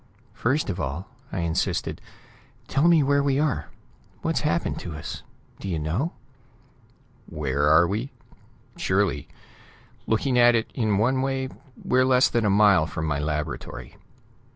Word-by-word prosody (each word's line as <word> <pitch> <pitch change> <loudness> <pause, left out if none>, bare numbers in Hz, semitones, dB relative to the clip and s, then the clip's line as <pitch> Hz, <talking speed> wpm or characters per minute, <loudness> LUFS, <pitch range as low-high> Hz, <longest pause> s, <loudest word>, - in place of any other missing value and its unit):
"First 130 -1 0
of 90 - -6
all," 85 +7 -4 0.2
I 90 - -2
insisted, 85 -1 -1 0.7
"tell 140 +5 +2
me 165 -3 +5
where 140 +1 +3
we 140 -1 +1
are; 150 -4 0 0.6
what's - - +1
happened - - -1
to 85 - -7
us. 80 +1 -6 0.4
Do 100 - -5
you 85 - -1
know?" 85 - -2 1.1
"Where 75 +3 +3
we 105 +7 -2
are? - - -11 0.7
Surely. - - 0 0.8
Looking 125 +3 +1
at 120 0 +6
it 115 - -1
in 110 -5 +1
one 130 +5 +2
way, 135 0 -1 0.4
we're 130 0 +3
less 130 0 +4
than 115 -2 0
a - - +3
mile 100 -5 +5
from 80 - -4
my 75 -2 -1
laboratory." 75 0 -4
105 Hz, 145 wpm, -25 LUFS, 80-130 Hz, 1.1 s, at